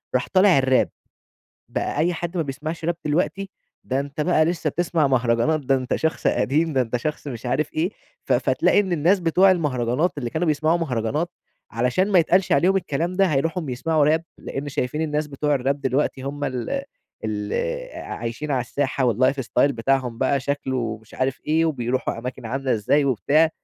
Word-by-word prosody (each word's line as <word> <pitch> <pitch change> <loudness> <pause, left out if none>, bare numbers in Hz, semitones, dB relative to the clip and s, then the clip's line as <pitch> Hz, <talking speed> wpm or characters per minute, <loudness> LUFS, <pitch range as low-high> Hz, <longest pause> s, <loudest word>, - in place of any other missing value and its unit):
راح 125 - +1
طالع 190 -2 +6
الراب 130 -1 +3 0.8
بقى - - -2
أي 175 +3 +2
حد 175 +2 -4
ما 165 - +2
بيسمعش 150 +4 -5
راب 170 +1 0
دلوقتي، 185 +6 -1 0.3
ده 130 +1 0
أنت 140 +1 -5
بقى 155 0 +3
لسه 165 -2 -1
بتسمع 165 -2 +1
مهرجانات، 125 +4 +2
ده 135 0 +1
أنت 130 -1 -1
شخص 160 +1 -1
قديم، 155 +4 +2
ده 130 - +2
أنت 120 0 -2
شخص 150 +5 -4
مش 125 -3 -6
عارف 145 +5 0
إيه؛ 165 +4 0 0.3
ف - - 0
فتلاقي - - +3
إن 190 -3 -2
الناس 175 +5 +3
بتوع 180 +3 +4
المهرجانات 150 -2 +1
اللي 120 -3 -3
كانوا 165 +2 -1
بيسمعوا 155 +2 +2
مهرجانات 145 +2 -1 0.4
علشان 125 - +1
ما 185 - +6
يتقالش 180 +3 +3
عليهم 180 +7 +4
الكلام 170 -1 -1
ده، 195 0 +4
هايروحوا 165 +6 0
يسمعوا 150 +4 +1
راب؛ 155 +2 +3 0.2
لأن 145 +1 -5
شايفين 135 +3 -2
الناس 150 -1 -1
بتوع 145 0 -1
الراب 140 +2 0
دلوقتي 135 0 0
هُم 145 +2 -4
ال 135 - -2 0.4
اللي - - -2
عايشين 120 +6 -5
على 130 -3 +1
الساحة، 135 +2 -1
و 120 - +2
الlife 130 +5 +2
style 120 - +1
بتاعهم 125 -1 0
بقى 135 +1 +1
شكله 130 -5 -2
مش 110 - -17
عارف 130 0 -1
إيه، 160 +2 +3
وبيروحوا 130 -6 -1
أماكن 125 0 -6
عاملة 135 +3 -1
إزاي 140 +7 +2
وبتاع، 145 +5 +3
145 Hz, 180 wpm, -23 LUFS, 130-165 Hz, 0.8 s, طالع